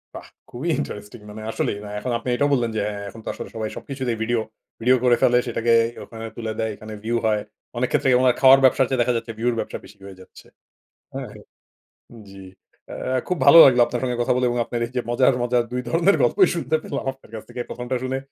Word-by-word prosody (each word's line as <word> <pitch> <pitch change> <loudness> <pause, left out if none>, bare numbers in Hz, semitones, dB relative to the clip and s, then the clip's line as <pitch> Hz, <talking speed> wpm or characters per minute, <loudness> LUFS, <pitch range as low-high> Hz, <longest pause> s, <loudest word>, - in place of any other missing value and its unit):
বাহ! - - -9 0.2
খুবই 135 +8 -4
ইন্টারেস্টিং 105 +3 -7
মানে 110 +1 -9
আসলেই। 100 - -2 0.2
এখন 125 - -4
আপনি 115 +2 -6
এটাও 145 +4 +1
বললেন 120 -4 +1
যে 110 - 0
হ্যাঁ, 100 -1 -7
এখন 115 - -12
তো - - -12
আসলে - - -8
সবাই 110 -1 -3
সবকিছুতেই 130 -4 -4
ভিডিও 115 0 0 0.4
ভিডিও 125 +3 +4
করে 125 -1 +5
ফেলে। 125 - +4
সেটাকে 115 0 +1 0.3
ওখানে 115 -1 -9
তুলে 115 -2 -4
দেয়, 110 0 -1
এখানে 110 +1 -10
ভিউ 115 +2 -1
হয়। 105 -1 +1 0.4
অনেক 125 +1 0
ক্ষেত্রে - - +2
ওনার 130 -1 +4
খাওয়ার 135 0 +8
ব্যবসার 130 0 +4
চেয়ে 130 -2 +1
দেখা 125 +1 +1
যাচ্ছে 115 0 -6
ভিউ 115 +2 -2
এর - - -4
ব্যবসা - - -4
বেশি 105 - -16
হয়ে 95 -1 -12
যাচ্ছে। - - -16 0.7
হ্যাঁ? - - -6 1.0
জ্বী। 95 -1 -12 0.5
এ - - -5 0.3
খুব 180 - -1
ভালো 140 +4 +9
লাগলো 125 -2 +5
আপনার 120 - -4
সঙ্গে 125 -2 -1
কথা - - +1
বলে 125 0 +1
এবং 120 - -2
আপনার 120 +1 -4
এই - - -13
যে - - +2
মজার, 130 +2 +3
মজার 120 0 +1
২ 125 - -1
ধরনের 175 +4 +3
গল্পই 380 - +4
শুনতে 160 -2 0
পেলাম - - -5
আপনার 135 -4 -21
কাছ 110 - -6
থেকে। 125 - -7
প্রথমটা 125 +1 -4
শুনে 130 +1 -2
120 Hz, 220 wpm, -22 LUFS, 115-130 Hz, 1.0 s, ভালো